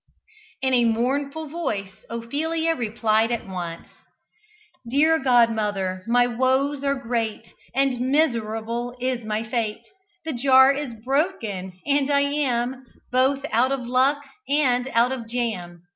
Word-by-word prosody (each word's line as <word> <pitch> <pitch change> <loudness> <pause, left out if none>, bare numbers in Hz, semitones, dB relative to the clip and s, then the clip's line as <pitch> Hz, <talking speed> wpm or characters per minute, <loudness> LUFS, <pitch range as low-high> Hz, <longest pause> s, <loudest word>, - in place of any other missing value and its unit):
In 260 0 +2
a 240 -1 +4
mournful 275 +7 -1
voice 215 - -3 0.2
Ophelia 315 +8 -1
replied 225 -3 +1
at 235 -4 -3
once: 175 -3 -6 1.0
"Dear 315 +5 +4
godmother! 215 -7 +1
my 245 +1 +4
woes 260 +4 0
are 280 0 +1
great, 230 -3 -3 0.2
And 260 -2 +1
miserable 235 -4 0
is 250 -1 -2
my 215 +1 -2
fate: 220 -2 -3 0.4
The 320 - -2
jar 265 +1 +6
is 280 -4 -4
broken! 230 - -1
and 285 -1 +2
I 280 -1 +3
am 265 -3 -1 0.3
Both 265 +3 +2
'out 245 +4 +3
of 275 -1 -1
luck' 265 +4 +2 0.3
and 260 -4 +2
'out 240 -1 +2
of' 245 -4 -5
jam! 195 -8 -3
245 Hz, 130 wpm, -23 LUFS, 225-275 Hz, 1.0 s, jar